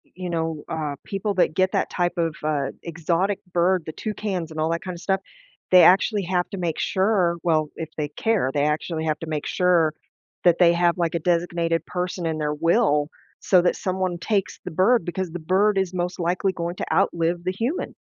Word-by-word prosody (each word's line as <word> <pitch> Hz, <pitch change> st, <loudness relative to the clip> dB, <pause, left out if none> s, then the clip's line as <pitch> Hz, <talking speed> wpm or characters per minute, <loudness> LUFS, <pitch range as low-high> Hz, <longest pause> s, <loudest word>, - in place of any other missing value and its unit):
you 185 Hz, -1 st, -5 dB
know, 160 Hz, -2 st, -2 dB
uh, 155 Hz, -3 st, -3 dB
people 200 Hz, +1 st, -2 dB
that 180 Hz, -3 st, +2 dB
get 185 Hz, 0 st, +2 dB
that -, -, 0 dB
type 175 Hz, -1 st, 0 dB
of, 165 Hz, -2 st, 0 dB
uh, 145 Hz, -3 st, 0 dB, 0.2 s
exotic 170 Hz, +4 st, -1 dB
bird, 180 Hz, 0 st, +2 dB
the -, -, -5 dB
toucans 200 Hz, -6 st, -4 dB
and 155 Hz, -, -6 dB
all 155 Hz, -, +1 dB
that 165 Hz, 0 st, -2 dB
kinda 180 Hz, -2 st, -5 dB
stuff, 190 Hz, +1 st, 0 dB, 0.5 s
they 180 Hz, -1 st, +8 dB
actually 195 Hz, +2 st, +4 dB
have 180 Hz, 0 st, 0 dB
to 195 Hz, -, -5 dB
make 170 Hz, -4 st, -2 dB
sure, 190 Hz, -3 st, +1 dB
well, 155 Hz, -3 st, +1 dB
if 160 Hz, -1 st, -5 dB
they 150 Hz, -2 st, -2 dB
care, 195 Hz, -3 st, 0 dB
they 145 Hz, 0 st, +1 dB
actually 160 Hz, +1 st, -1 dB
have 155 Hz, -1 st, 0 dB
to 165 Hz, -, -7 dB
make 155 Hz, -2 st, -3 dB
sure 175 Hz, -4 st, +2 dB, 0.5 s
that 175 Hz, -2 st, +5 dB
they 170 Hz, -1 st, +6 dB
have, 170 Hz, 0 st, +2 dB
like, 170 Hz, -1 st, 0 dB
a -, -, +1 dB
designated 170 Hz, 0 st, 0 dB
person 180 Hz, -1 st, -3 dB
in 160 Hz, -1 st, -2 dB
their 150 Hz, -1 st, -1 dB
will 150 Hz, -2 st, +2 dB, 0.3 s
so 185 Hz, -2 st, +4 dB
that 175 Hz, -, +1 dB
someone 185 Hz, -1 st, -2 dB
takes 200 Hz, 0 st, -1 dB
the -, -, -5 dB
bird 185 Hz, +4 st, +3 dB
because 175 Hz, 0 st, -3 dB
the 175 Hz, -, -5 dB
bird 195 Hz, +5 st, +2 dB
is 190 Hz, -1 st, 0 dB
most 180 Hz, 0 st, -3 dB
likely 180 Hz, +3 st, 0 dB
going 170 Hz, -1 st, -4 dB
to -, -, -3 dB
outlive 170 Hz, +1 st, +1 dB
the 185 Hz, -, 0 dB
human. 235 Hz, -, -3 dB
175 Hz, 205 wpm, -23 LUFS, 160-185 Hz, 0.5 s, they